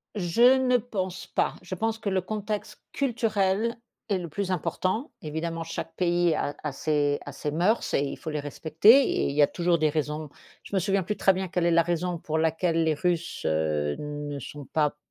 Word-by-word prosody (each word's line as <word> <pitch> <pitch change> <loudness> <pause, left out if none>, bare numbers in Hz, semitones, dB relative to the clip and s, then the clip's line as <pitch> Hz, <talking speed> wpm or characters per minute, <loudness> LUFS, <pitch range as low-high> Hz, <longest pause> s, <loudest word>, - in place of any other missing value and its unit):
Je 230 +8 +5
ne 255 -1 +2
pense 190 -6 -4
pas. - - 0
Je 180 +1 -7
pense 225 +4 -1
que 225 -2 -3
le 190 -1 +1
contexte 210 +2 -4
culturel 225 -4 0 0.3
est 200 - +2
le 175 -2 -5
plus 190 +4 -3
important. 190 - -1
Évidemment 165 +2 -3
chaque 165 - -6
pays 175 -2 +2
a 145 - -1
a 150 - -2
ses 145 0 +1
a 145 - -6
ses 145 +2 -4
mœurs 180 +9 +1
et 140 - +3
il 140 - -5
faut - - -6
les 150 -1 -2
respecter 155 +7 +4
et - - 0
il - - -2
y 150 - +4
a 145 - +7
toujours 175 -1 +1
des 155 - +3
raisons. 150 0 -2 0.3
Je - - -6
me - - +4
souviens 195 +1 +1
plus 210 +4 -2
très 195 - +4
bien 190 0 -2
quelle 180 -1 0
est 170 - +3
la 170 0 +5
raison 175 +1 -1
pour 160 -1 -3
laquelle 165 +1 +1
les 160 -1 +2
Russes, 170 +2 -1
heu, 75 -2 0
ne 145 -1 -5
sont 145 +2 -8
pas 150 0 0
170 Hz, 210 wpm, -27 LUFS, 150-195 Hz, 0.3 s, a